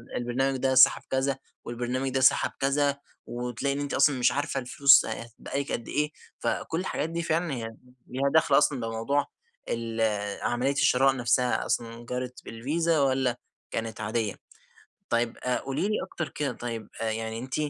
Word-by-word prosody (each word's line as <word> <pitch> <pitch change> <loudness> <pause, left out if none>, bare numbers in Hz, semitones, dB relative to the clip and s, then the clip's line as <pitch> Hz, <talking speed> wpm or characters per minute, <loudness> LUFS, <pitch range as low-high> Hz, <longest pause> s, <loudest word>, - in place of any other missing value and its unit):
البرنامج 130 +3 0
ده 130 0 +1
سحب 130 - +7
كذا 130 0 0 0.3
والبرنامج 125 +3 -2
ده 135 0 0
سحب 130 - +4
كذا، 140 +1 +1 0.3
وتلاقي 125 +3 -2
إن - - -3
أنتِ 145 0 -3
أصلًا 135 0 +4
مش 120 - +4
عارفة 140 -1 -1
الفلوس 140 +2 +6
هتتبقى 115 +4 -5
لِك 140 - -7
قد 120 - -3
إيه 150 +1 0 0.3
فكل 160 - -1
الحاجات 170 -4 -2
دي 170 +1 -2
فعلًا 165 -1 0
هي 115 -3 -4 0.4
ليها 135 +2 0
دخل 160 -3 +5
أصلًا 145 -2 +3
بموضوع 115 +5 -1 0.4
ال 115 -1 -2 0.4
عملية 125 +3 +1
الشراء 135 -1 +3
نفسها 125 0 +1
أصلًا 115 0 -2
جرت 125 +1 -5
بالفيزا 155 +8 0
والّا 130 -3 +2 0.3
كانت 115 -1 -4
عادية. 110 -1 -1 0.7
طيب 115 0 0
آآ، 125 0 -1
قولي 135 +8 -2
لي 210 - 0
أكتر 170 -4 -5
كده 145 -2 -2
طيب 115 -3 -6
يعني 110 0 -2
أنتِ 130 +2 -5
130 Hz, 160 wpm, -27 LUFS, 120-140 Hz, 0.7 s, سحب